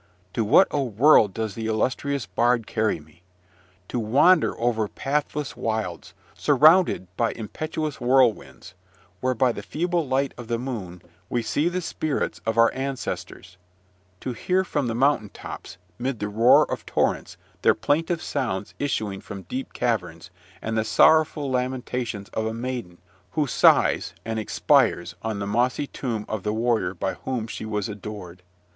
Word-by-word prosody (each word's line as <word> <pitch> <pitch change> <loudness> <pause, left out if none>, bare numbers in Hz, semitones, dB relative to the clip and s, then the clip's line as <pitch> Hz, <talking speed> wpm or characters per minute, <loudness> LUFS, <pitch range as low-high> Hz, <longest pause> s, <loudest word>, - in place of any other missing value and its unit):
To 115 - 0
what 115 - +6
a 145 - 0
world 120 -2 +5
does 110 +1 -3
the 110 +2 -4
illustrious 130 +4 -1
bard 115 +5 +1
carry 110 -5 0
me! 80 +3 -20 0.7
To 125 - -2
wander 140 +11 +4
over 115 -2 +1
pathless 145 +3 -2
wilds, 110 -6 -3 0.2
surrounded 155 - +4
by 115 -1 +1
impetuous 155 +6 -4
whirlwinds, 120 -7 +1 0.5
where, 130 0 0
by 125 +2 +3
the - - -6
feeble 170 -1 -1
light 135 +1 0
of 120 - -8
the 120 0 0
moon, 105 -9 -6 0.3
we 120 -1 -1
see 145 +8 +1
the 180 +1 -2
spirits 155 -3 -2
of 110 0 0
our 115 0 +6
ancestors; 130 -8 -5 0.6
to 125 - -3
hear 185 +10 +1
from 145 -7 -1
the 115 - -2
mountain 130 -4 +2
tops, - - -9 0.2
mid 130 0 -2
the 105 0 -3
roar 115 +4 +5
of - - -3
torrents, - - -1 0.2
their - - +4
plaintive 165 +3 0
sounds 110 -9 -3
issuing 110 -8 -2
from 100 -1 -8
deep 130 +10 -5
caverns, 90 -8 -2 0.3
and 110 0 -2
the 110 - +2
sorrowful 155 +4 +4
lamentations 125 -4 -2
of 110 0 -2
a 110 - -3
maiden 120 -7 -5 0.4
who 150 - +1
sighs 135 - +3
and 110 0 -2
expires 110 - +2
on 110 -2 -3
the 100 - -3
mossy 120 +7 +1
tomb 115 -6 -4
of 110 -2 -3
the 105 +2 -2
warrior 110 -5 0
by 95 +2 -2
whom 125 -4 -4
she 110 -1 -6
was 105 -2 -2
adored. 100 -4 -8
120 Hz, 155 wpm, -24 LUFS, 105-135 Hz, 0.7 s, what